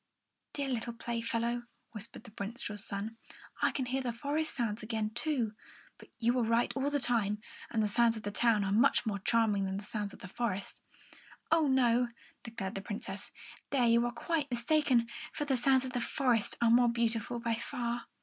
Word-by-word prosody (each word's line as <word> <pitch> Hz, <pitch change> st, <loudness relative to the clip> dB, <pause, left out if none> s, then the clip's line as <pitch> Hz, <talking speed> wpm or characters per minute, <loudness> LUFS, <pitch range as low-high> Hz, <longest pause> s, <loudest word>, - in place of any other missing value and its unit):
"Dear 280 Hz, -1 st, -2 dB
little 235 Hz, -2 st, -2 dB
playfellow," 235 Hz, +1 st, -2 dB, 0.2 s
whispered 215 Hz, 0 st, -8 dB
the 230 Hz, -4 st, -14 dB
minstrel's 210 Hz, -1 st, -2 dB
son, 215 Hz, +3 st, -4 dB, 0.4 s
"I -, -, +5 dB
can 260 Hz, -, -2 dB
hear 260 Hz, +2 st, -1 dB
the 250 Hz, -2 st, -1 dB
forest 295 Hz, +6 st, -1 dB
sounds 230 Hz, -3 st, -1 dB
again, 215 Hz, -1 st, -2 dB
too; 240 Hz, -3 st, -1 dB, 0.5 s
but -, -, -14 dB
you 235 Hz, +1 st, +2 dB
were 250 Hz, -, +2 dB
right 230 Hz, +1 st, +2 dB
all 275 Hz, +1 st, +1 dB
the 290 Hz, 0 st, +1 dB
time, 210 Hz, -5 st, +1 dB, 0.3 s
and 220 Hz, -2 st, +1 dB
the -, -, +2 dB
sounds 230 Hz, +2 st, +3 dB
of 215 Hz, -, -8 dB
the 205 Hz, -, -3 dB
town 220 Hz, -1 st, +3 dB
are 195 Hz, -, -1 dB
much 220 Hz, +3 st, +4 dB
more 205 Hz, -3 st, -1 dB
charming 210 Hz, -1 st, +2 dB
than 190 Hz, 0 st, -2 dB
the 200 Hz, -, -5 dB
sounds 210 Hz, -1 st, -4 dB
of -, -, -14 dB
the -, -, -7 dB
forest." 200 Hz, -1 st, -3 dB, 0.7 s
"Oh, 325 Hz, -2 st, +5 dB
no," 250 Hz, -2 st, +4 dB, 0.3 s
declared 225 Hz, -5 st, -5 dB
the 195 Hz, -, -4 dB
Princess. 205 Hz, +1 st, -5 dB, 0.4 s
"There 260 Hz, -3 st, +3 dB
you 235 Hz, 0 st, +5 dB
are -, -, -2 dB
quite 295 Hz, +4 st, -1 dB
mistaken, 245 Hz, -1 st, +3 dB, 0.3 s
for 295 Hz, -, -2 dB
the 275 Hz, -2 st, +2 dB
sounds 260 Hz, +1 st, +3 dB
of 255 Hz, -, -6 dB
the 245 Hz, -, 0 dB
forest 245 Hz, -4 st, +1 dB
are 230 Hz, -, +5 dB
more 240 Hz, 0 st, +6 dB
beautiful 235 Hz, 0 st, 0 dB
by 230 Hz, 0 st, 0 dB
far." 235 Hz, +1 st, -3 dB
235 Hz, 195 wpm, -32 LUFS, 215-250 Hz, 0.7 s, more